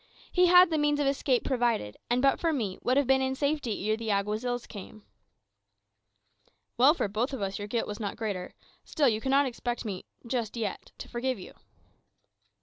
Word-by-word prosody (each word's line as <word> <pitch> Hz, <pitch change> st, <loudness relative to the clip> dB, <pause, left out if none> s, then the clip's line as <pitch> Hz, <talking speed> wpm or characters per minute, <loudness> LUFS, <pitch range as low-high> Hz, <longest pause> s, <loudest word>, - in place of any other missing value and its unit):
He 360 Hz, 0 st, +4 dB
had 360 Hz, 0 st, +7 dB
the 315 Hz, -, +1 dB
means 295 Hz, 0 st, +2 dB
of 290 Hz, -, +1 dB
escape 275 Hz, -2 st, +1 dB
provided, 235 Hz, -, 0 dB
and 245 Hz, +2 st, +1 dB
but 275 Hz, -, +4 dB
for 330 Hz, -, +1 dB
me 220 Hz, -11 st, -2 dB
would 255 Hz, +2 st, +1 dB
have 285 Hz, -, +3 dB
been 265 Hz, +1 st, +3 dB
in 265 Hz, 0 st, 0 dB
safety 280 Hz, -8 st, -1 dB
ere 215 Hz, -, +2 dB
the 225 Hz, 0 st, -5 dB
Alguazils 215 Hz, +5 st, -1 dB
came." 210 Hz, +1 st, -10 dB, 1.7 s
"Well 270 Hz, +6 st, +6 dB
for 220 Hz, -, 0 dB
both 225 Hz, +7 st, -2 dB
of 265 Hz, -, -4 dB
us 195 Hz, +1 st, -3 dB
your 205 Hz, -, -5 dB
guilt 230 Hz, +2 st, -1 dB
was 210 Hz, 0 st, -6 dB
not 205 Hz, -3 st, -3 dB
greater. 200 Hz, -5 st, -4 dB, 0.3 s
Still, 290 Hz, -3 st, +1 dB
you 220 Hz, -2 st, +1 dB
cannot 275 Hz, +3 st, +3 dB
expect 240 Hz, -1 st, -4 dB
me 195 Hz, -4 st, -5 dB, 0.2 s
just 235 Hz, -2 st, -2 dB
yet 220 Hz, -3 st, -4 dB
to -, -, -8 dB
forgive 255 Hz, +1 st, -2 dB
you." 185 Hz, -, -11 dB
245 Hz, 190 wpm, -29 LUFS, 215-275 Hz, 1.7 s, had